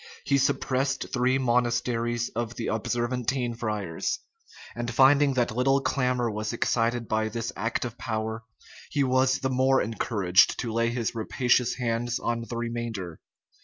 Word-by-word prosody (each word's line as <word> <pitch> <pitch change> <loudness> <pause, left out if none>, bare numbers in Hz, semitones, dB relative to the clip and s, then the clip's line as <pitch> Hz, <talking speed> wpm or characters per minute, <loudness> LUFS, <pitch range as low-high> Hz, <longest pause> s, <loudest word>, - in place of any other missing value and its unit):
He 140 -1 +3
suppressed 135 0 0
three 130 +1 +2
monasteries 120 -1 0
of 120 +1 -4
the 115 - -3
Observantine 120 +2 -1
friars; 105 -7 -2 0.6
and 120 0 -3
finding 135 +2 +5
that 120 -3 0
little 135 +2 +3
clamor 125 -3 0
was 105 +1 -3
excited 115 0 0
by 110 0 0
this 115 +2 -4
act 115 +5 -2
of 120 0 -7
power, 110 0 -3 0.5
he 145 -3 +1
was 130 +1 +3
the 130 -1 0
more 130 +1 +3
encouraged 100 -4 +2
to 115 -2 -4
lay 115 +1 +2
his 120 -1 -2
rapacious 120 +2 +1
hands 120 0 -1
on 115 0 -2
the 120 - -4
remainder. 115 -7 -4
120 Hz, 145 wpm, -27 LUFS, 115-130 Hz, 0.6 s, finding